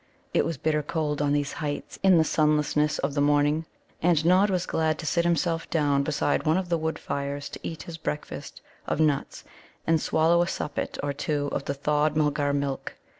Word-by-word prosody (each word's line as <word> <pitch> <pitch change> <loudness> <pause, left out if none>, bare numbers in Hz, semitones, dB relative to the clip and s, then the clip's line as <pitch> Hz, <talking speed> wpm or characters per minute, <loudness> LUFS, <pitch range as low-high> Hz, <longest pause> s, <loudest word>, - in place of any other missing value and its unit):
It - - +3
was 165 -3 -2
bitter 150 +2 +1
cold 150 -1 -2
on 145 -1 +1
these 145 -1 0
heights 145 -2 -5
in 190 -2 +6
the 160 - +5
sunlessness 150 -1 +2
of 140 +1 -2
morning. 145 +2 +2 0.3
And 165 -2 +3
Nod 185 +4 +5
was 185 -2 0
glad 160 -2 0
to - - -7
sit 170 +3 +1
himself 170 -1 0
down 145 -3 +2
beside 145 0 0
one 160 +2 +2
of 185 -2 -2
the 170 - +2
wood 160 0 -2
fires 140 0 -4
to - - -8
eat 160 - -6
his 165 -1 -8
breakfast 150 -1 -5 0.3
of - - -1
nuts, 150 -3 0 0.4
and 165 -1 +2
swallow 165 +2 +3
a 175 - +1
suppet 150 -5 -3
or 145 -1 -1
two 145 0 -1
of - - -3
the 140 - -2
thawed 150 +2 +1
Mulgar 150 -1 +1
milk. 140 -1 -2
150 Hz, 195 wpm, -26 LUFS, 145-165 Hz, 0.4 s, in